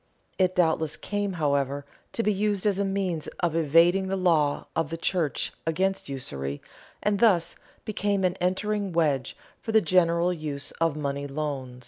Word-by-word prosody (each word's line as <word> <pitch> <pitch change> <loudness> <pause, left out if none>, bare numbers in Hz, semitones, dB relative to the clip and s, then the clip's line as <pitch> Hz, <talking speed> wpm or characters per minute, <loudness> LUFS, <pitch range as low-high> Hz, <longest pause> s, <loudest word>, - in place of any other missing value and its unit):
It 185 -1 +2
doubtless 160 -3 +2
came, 205 -1 -2
however, 140 -3 0 0.3
to 230 - 0
be 210 - +2
used 205 0 0
as 200 -2 +2
a - - +2
means 195 -5 -1
of 170 -3 +1
evading 165 +4 +4
the 190 - -1
law 165 -6 +2
of 165 -3 0
the 165 - -4
church 165 -3 -1
against 190 +1 0
usury, 70 - -3 0.4
and 205 -1 +1
thus 195 -7 +3 0.3
became 205 -2 0
an 180 -1 +2
entering 200 +1 0
wedge 145 -6 +1 0.2
for 225 - -4
the 220 - +6
general 170 -1 +3
use 145 -4 -4
of 165 -3 +2
money 140 -1 -3
loans. 135 -4 -4
170 Hz, 160 wpm, -26 LUFS, 145-195 Hz, 0.4 s, the